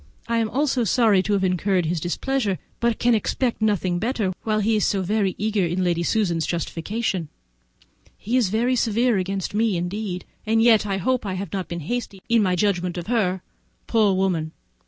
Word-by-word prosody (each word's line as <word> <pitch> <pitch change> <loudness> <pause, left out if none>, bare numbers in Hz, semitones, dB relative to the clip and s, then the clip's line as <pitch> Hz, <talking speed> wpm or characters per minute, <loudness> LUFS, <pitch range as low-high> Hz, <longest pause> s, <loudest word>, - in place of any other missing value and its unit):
I 230 0 +1
am 225 -1 0 0.2
sorry 230 -5 +3
to 210 +2 -1
have 195 -1 +1
incurred 185 0 +1
his 165 +1 -1
displeasure, 205 - -1 0.2
but 235 -1 +1
can 240 0 +3
expect 230 +2 0
nothing 185 -5 +1
better 220 -4 -1
while 215 -1 0
he 220 +2 +2
is 210 - +1
so 195 -2 +1
very 200 0 0
eager 210 -1 0
in 175 +2 0
Lady 170 -1 +1
Susan's 170 -4 0
justification. 175 +1 -2 0.9
He 230 +4 -3
is 240 -7 +3
very 235 +5 +1
severe 230 0 +2
against 195 +1 -3
me 215 -3 +1
indeed, 180 +1 -4 0.2
and 225 +1 +1
yet 225 -2 +5
I 195 -1 -1
hope 255 +7 0
I 195 -3 -3
have 190 -1 -5
not 190 -4 -3
been 170 0 -5
hasty 215 +3 -4
in 230 -1 +3
my 185 -3 +2
judgment 180 -2 0
of 175 - -4
her. 190 -5 0 0.4
Poor 215 -4 +3
woman! 170 -5 0
200 Hz, 185 wpm, -23 LUFS, 180-225 Hz, 0.9 s, yet